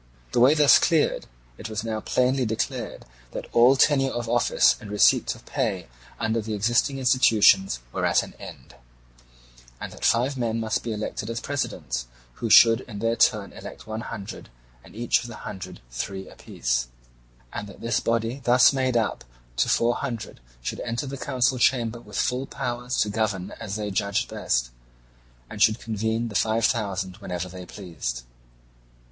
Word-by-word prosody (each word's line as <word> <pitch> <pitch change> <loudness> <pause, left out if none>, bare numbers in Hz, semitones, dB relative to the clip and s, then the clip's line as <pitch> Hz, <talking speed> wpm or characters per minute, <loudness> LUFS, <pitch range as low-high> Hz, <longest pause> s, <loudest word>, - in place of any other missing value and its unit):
The - - +1
way 130 +5 +6
thus 150 -2 +7
cleared, 160 -3 +1 0.3
it 110 - -6
was 110 0 -3
now 110 -1 -2
plainly 130 +4 +1
declared 110 -1 -3 0.3
that - - -5
all 120 +3 +6
tenure 135 0 +3
of 120 -2 -4
office 120 0 +3
and 105 - -9
receipt 105 0 +3
of - - -17
pay 90 -7 -2 0.3
under 115 0 0
the 110 0 -4
existing 120 +6 +1
institutions 110 - +4
were - - -3
at - - +3
an - - -10
end, - - -11 1.1
and - - -6
that - - -12
five 130 +4 +2
men 115 -1 -1
must 110 -1 -1
be 115 - -4
elected 105 0 -4
as 115 0 -3
presidents, 70 - -3 0.3
who 115 - -1
should 115 +2 +7
in 110 -5 -9
their 115 +2 0
turn 105 -3 +2
elect - - -10
one 110 +1 -5
hundred, 105 -4 -8 0.3
and - - -16
each 120 +2 +1
of 120 - -8
the 115 - -9
hundred 95 -2 -7
three 95 +10 -5
apiece; - - -2 0.7
and 105 - -5
that 100 - -13
this 115 -1 0
body 115 +3 -1
thus 125 +3 +6
made 130 -2 +1
up 115 - -1 0.3
to - - +2
four 120 +1 +3
hundred 120 - -5 0.2
should - - -4
enter 120 +4 -3
the 135 0 -5
council 130 -1 0
chamber 120 -2 +2
with 105 -3 -9
full 130 +2 0
powers 125 -3 -2
and 105 - -5
govern 105 -4 -1
as 105 -3 -5
they 105 -1 -3
judged 100 +1 -1
best, - - -1 0.8
and 105 - -8
should 110 +2 +4
convene 110 +1 -2
the - - -9
five 110 +2 +2
thousand 95 -5 -1
whenever 90 -4 -5
they 90 0 -10
pleased. 75 -11 -5
115 Hz, 170 wpm, -25 LUFS, 100-120 Hz, 1.1 s, thus